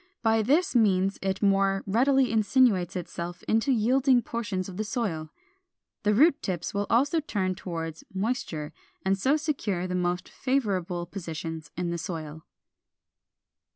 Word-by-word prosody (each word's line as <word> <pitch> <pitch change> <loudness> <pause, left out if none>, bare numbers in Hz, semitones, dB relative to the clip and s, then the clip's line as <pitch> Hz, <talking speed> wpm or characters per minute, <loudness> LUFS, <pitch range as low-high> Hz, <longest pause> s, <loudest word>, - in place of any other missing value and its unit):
By 225 -1 +3
this 290 - +2
means 195 -4 +3
it 195 +1 -2
more 195 -1 +3
readily 260 +5 +3
insinuates 215 -5 +3
itself 175 -1 -5
into 225 +5 +1
yielding 250 +2 +3
portions 210 -6 -3
of 185 -2 -8
the 215 - -1
soil. 195 -9 -3 0.7
The 210 0 +2
root 290 +5 +5
tips 175 -3 -3
will 205 0 -1
also 280 +8 +3
turn 195 -11 -1
toward 165 -3 -5
moisture, 190 -7 -3 0.3
and 190 0 +3
so 265 +10 +2
secure 230 - -2
the 180 - -3
most 180 0 -1
favorable 190 -10 -1
positions 165 -3 -6
in 175 -1 -1
the 170 - -3
soil. 160 -3 -6
195 Hz, 140 wpm, -27 LUFS, 175-235 Hz, 0.7 s, root